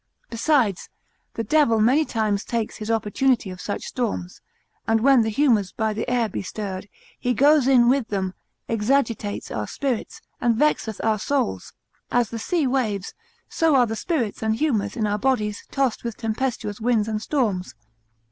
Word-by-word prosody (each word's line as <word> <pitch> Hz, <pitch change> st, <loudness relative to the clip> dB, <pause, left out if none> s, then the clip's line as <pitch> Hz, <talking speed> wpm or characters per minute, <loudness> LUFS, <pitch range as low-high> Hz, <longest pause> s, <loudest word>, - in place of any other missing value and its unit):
Besides, 230 Hz, -, +1 dB, 0.5 s
the 230 Hz, -, -2 dB
devil 230 Hz, -2 st, +3 dB
many 260 Hz, +8 st, +4 dB
times 215 Hz, -5 st, -1 dB
takes 230 Hz, -3 st, -3 dB
his 215 Hz, 0 st, -6 dB
opportunity 225 Hz, 0 st, +1 dB
of 185 Hz, -, -9 dB
such 205 Hz, -, -4 dB
storms, 210 Hz, -7 st, -4 dB, 0.5 s
and 225 Hz, 0 st, +2 dB
when 270 Hz, 0 st, +6 dB
the 220 Hz, -, 0 dB
humours 220 Hz, -5 st, +2 dB
by 220 Hz, -1 st, -1 dB
the 220 Hz, +3 st, -3 dB
air 245 Hz, -2 st, +2 dB
be 210 Hz, -, -4 dB
stirred, 200 Hz, 0 st, -6 dB, 0.3 s
he 245 Hz, 0 st, 0 dB
goes 290 Hz, -1 st, +5 dB
in 250 Hz, -3 st, +5 dB
with 260 Hz, -2 st, +2 dB
them, 190 Hz, -2 st, -2 dB, 0.3 s
exagitates 225 Hz, -2 st, 0 dB
our 105 Hz, -1 st, -3 dB
spirits, 260 Hz, -5 st, -3 dB, 0.2 s
and 235 Hz, -1 st, +3 dB
vexeth 225 Hz, -5 st, +1 dB
our 220 Hz, -2 st, +1 dB
souls; 145 Hz, -, -1 dB, 0.4 s
as 240 Hz, -3 st, +1 dB
the 230 Hz, -, -4 dB
sea 330 Hz, +5 st, 0 dB
waves, 230 Hz, -7 st, -1 dB, 0.3 s
so 325 Hz, -3 st, +2 dB
are 250 Hz, -2 st, +5 dB
the 225 Hz, -1 st, -3 dB
spirits 245 Hz, -, -2 dB
and 220 Hz, 0 st, +1 dB
humours 225 Hz, -6 st, 0 dB
in 220 Hz, -, +1 dB
our 210 Hz, 0 st, 0 dB
bodies 215 Hz, -6 st, -1 dB
tossed 270 Hz, -4 st, 0 dB
with 235 Hz, -2 st, -4 dB
tempestuous 225 Hz, -2 st, -3 dB
winds 225 Hz, -2 st, +2 dB
and 215 Hz, -1 st, -2 dB
storms. 215 Hz, -9 st, -1 dB
225 Hz, 165 wpm, -23 LUFS, 210-260 Hz, 0.5 s, when